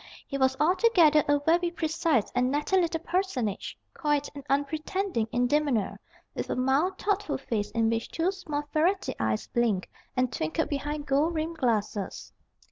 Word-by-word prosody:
He 275 Hz, -, -5 dB
was 265 Hz, -1 st, +2 dB
altogether 335 Hz, -3 st, +5 dB
a 290 Hz, 0 st, +4 dB
very 345 Hz, +2 st, +3 dB
precise 320 Hz, -7 st, 0 dB
and 250 Hz, 0 st, +2 dB
natty 295 Hz, +7 st, 0 dB
little 340 Hz, -3 st, +1 dB
personage, 330 Hz, -, -2 dB, 0.2 s
quiet 295 Hz, -2 st, 0 dB
and 285 Hz, -1 st, -8 dB
unpretending 295 Hz, -, -1 dB
in 245 Hz, 0 st, +2 dB
demeanour, 275 Hz, -6 st, +1 dB, 0.3 s
with -, -, -4 dB
a -, -, 0 dB
mild, 275 Hz, +9 st, +1 dB
thoughtful 410 Hz, -6 st, -1 dB
face 225 Hz, -6 st, -2 dB
in 225 Hz, -1 st, +1 dB
which 225 Hz, 0 st, -1 dB
two 335 Hz, +3 st, 0 dB
small 310 Hz, -7 st, -4 dB
ferrety 355 Hz, +6 st, +1 dB
eyes 110 Hz, -1 st, 0 dB
blinked 225 Hz, -6 st, 0 dB, 0.3 s
and 255 Hz, -1 st, +1 dB
twinkled 155 Hz, -6 st, -1 dB
behind 290 Hz, +1 st, -3 dB
gold 295 Hz, +4 st, +1 dB
rimmed 320 Hz, +1 st, -3 dB
glasses. 215 Hz, -6 st, -1 dB
290 Hz, 155 wpm, -28 LUFS, 245-335 Hz, 0.3 s, altogether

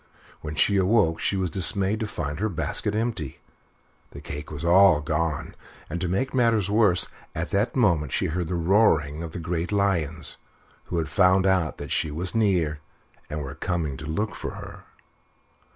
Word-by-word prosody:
When 75 Hz, 0 st, -6 dB
she 100 Hz, +5 st, +3 dB
awoke 95 Hz, -4 st, +3 dB
she 100 Hz, -, 0 dB
was 90 Hz, -3 st, -1 dB
dismayed 95 Hz, +4 st, +2 dB
to 110 Hz, -, -2 dB
find 75 Hz, -6 st, -4 dB
her 110 Hz, +2 st, 0 dB
basket 105 Hz, +3 st, -1 dB
empty. 110 Hz, -, -3 dB, 0.7 s
The -, -, -10 dB
cake 75 Hz, +1 st, -7 dB
was 75 Hz, +1 st, -6 dB
all 90 Hz, -2 st, +6 dB
gone! 75 Hz, +1 st, -2 dB, 0.4 s
and, 85 Hz, +2 st, -3 dB
to 90 Hz, -, 0 dB
make 100 Hz, +10 st, -1 dB
matters 115 Hz, -6 st, +2 dB
worse, 105 Hz, -5 st, +3 dB, 0.3 s
at 80 Hz, +1 st, -3 dB
that 105 Hz, +4 st, 0 dB
moment 85 Hz, -, +2 dB
she -, -, 0 dB
heard 85 Hz, +1 st, -2 dB
the 90 Hz, -, -2 dB
roaring 80 Hz, -5 st, +2 dB
of 85 Hz, -1 st, -6 dB
the -, -, -6 dB
great 85 Hz, +2 st, -3 dB
lions, 85 Hz, -6 st, 0 dB, 0.5 s
who 85 Hz, -, -3 dB
had 80 Hz, -1 st, -1 dB
found 90 Hz, +5 st, +3 dB
out 95 Hz, -5 st, +1 dB
that -, -, -7 dB
she 80 Hz, -, 0 dB
was 85 Hz, +5 st, -3 dB
near 90 Hz, -9 st, +1 dB, 0.5 s
and 75 Hz, 0 st, -4 dB
were 70 Hz, 0 st, -6 dB
coming 80 Hz, -2 st, -2 dB
to 80 Hz, -, -8 dB
look 105 Hz, +7 st, -2 dB
for -, -, -6 dB
her. -, -, -10 dB
85 Hz, 180 wpm, -25 LUFS, 80-100 Hz, 0.7 s, all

